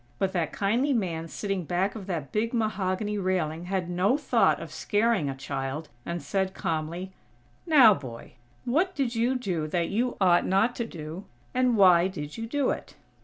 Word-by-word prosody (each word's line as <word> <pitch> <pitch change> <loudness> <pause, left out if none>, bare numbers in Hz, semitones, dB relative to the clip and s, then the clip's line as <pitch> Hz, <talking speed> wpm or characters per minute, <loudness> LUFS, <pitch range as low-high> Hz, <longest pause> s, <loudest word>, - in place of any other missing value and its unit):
But 190 +6 0
that 170 -4 -1
kindly 235 +8 +1
man 170 -8 -2
sitting 195 +1 -3
back 180 +4 0
of 205 -4 -8
that 160 -8 -4
big 225 +3 -1
mahogany 210 -1 -1
railing 175 -3 -1
had 185 -1 -2
no 185 +8 +2
thought 300 - +2
of - - -8
scaring 210 -7 +1
a 135 - -4
child, 135 +3 -4 0.2
and 170 -2 -3
said 190 +4 -1
calmly: 165 +4 -3 0.6
"Now, 270 -9 +8
boy, 125 -9 -9 0.3
what 340 +10 +1
did 265 -4 0
you 240 +3 +1
do 180 -11 -2
that 170 +1 -1
you 240 +4 -1
ought 180 -3 +4
not 200 +6 +2
to 235 - -2
do; 160 +2 -8 0.3
and 250 -2 +2
why 180 -3 +6
did 150 -6 -6
you 225 0 -5
do 280 +2 +1
it?" - - -6
190 Hz, 175 wpm, -27 LUFS, 170-225 Hz, 0.6 s, Now